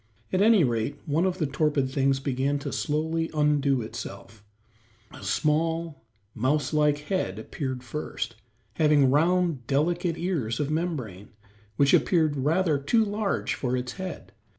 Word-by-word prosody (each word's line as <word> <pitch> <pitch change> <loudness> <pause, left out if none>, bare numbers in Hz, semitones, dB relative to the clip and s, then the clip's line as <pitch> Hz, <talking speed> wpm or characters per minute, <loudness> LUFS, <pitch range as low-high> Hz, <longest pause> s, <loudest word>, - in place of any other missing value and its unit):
At 185 - +2
any 215 -3 +6
rate, 120 +3 -1
one 160 +5 +1
of 185 -1 -2
the 160 - 0
torpid 140 -1 0
things 135 0 +1
began 135 +1 0
to - - -2
slowly 160 +2 -1
undo 145 -4 +2
itself; 110 -1 -9 0.7
a - - -12
small, 160 - 0 0.3
mouse 140 +7 0
like 150 -1 +3
head 150 - -2
appeared 130 +3 -5
first, 120 -3 -5 0.4
having 150 -4 +4
round, 165 -3 +2
delicate 170 +4 0
ears 150 -11 -2
of 145 0 -1
membrane, 135 - -3 0.5
which 140 +3 +3
appeared 160 -5 +3
rather 155 +2 +1
too 220 - +2
large 205 0 -1
for 125 -1 -1
its 125 0 -4
head. 185 +1 -7
150 Hz, 140 wpm, -26 LUFS, 130-165 Hz, 0.7 s, any